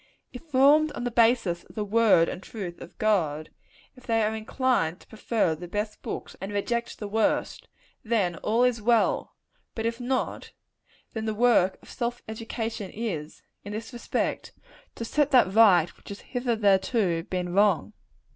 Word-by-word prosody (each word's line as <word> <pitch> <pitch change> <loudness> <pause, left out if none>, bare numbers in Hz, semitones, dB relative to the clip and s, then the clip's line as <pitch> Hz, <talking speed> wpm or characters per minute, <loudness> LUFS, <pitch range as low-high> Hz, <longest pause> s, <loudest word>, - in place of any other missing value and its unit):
If 250 - -8
formed 295 +2 +4
on - - -5
the 245 - -2
basis 225 -7 +2
of - - -18
the 210 -2 -2
word 205 -5 +4
and - - -5
truth 190 -5 -7
of - - -12
God 160 -8 0 0.4
if 255 - -17
they 225 -1 +2
are 215 +1 0
inclined 220 -6 0
to - - -19
prefer 220 -5 0
the 175 +3 -8
best 210 +3 -4
books - - -6
and 195 +1 -5
reject 235 +4 -2
the 210 - -5
worst 220 - 0 0.4
then 205 -7 0
all 225 +7 +1
is 245 -3 +1
well 230 +1 +1 0.4
but 225 - -3
if 230 +1 -2
not, 255 +1 -3 0.6
then 220 -1 -4
the 220 -1 -2
work 210 -5 +3
of - - -16
self 240 -1 -3
education 220 -2 -5
is, 180 -9 -5 0.2
in 205 - -7
this 225 +4 -6
respect, 240 - -3 0.4
to 230 - -5
set 295 +4 +1
that 245 -8 +4
right 190 -7 +5
which - - -16
has 200 - -8
hitherto 215 -6 +1
been 180 -1 -3
wrong. 205 0 +2
220 Hz, 165 wpm, -26 LUFS, 195-235 Hz, 0.6 s, right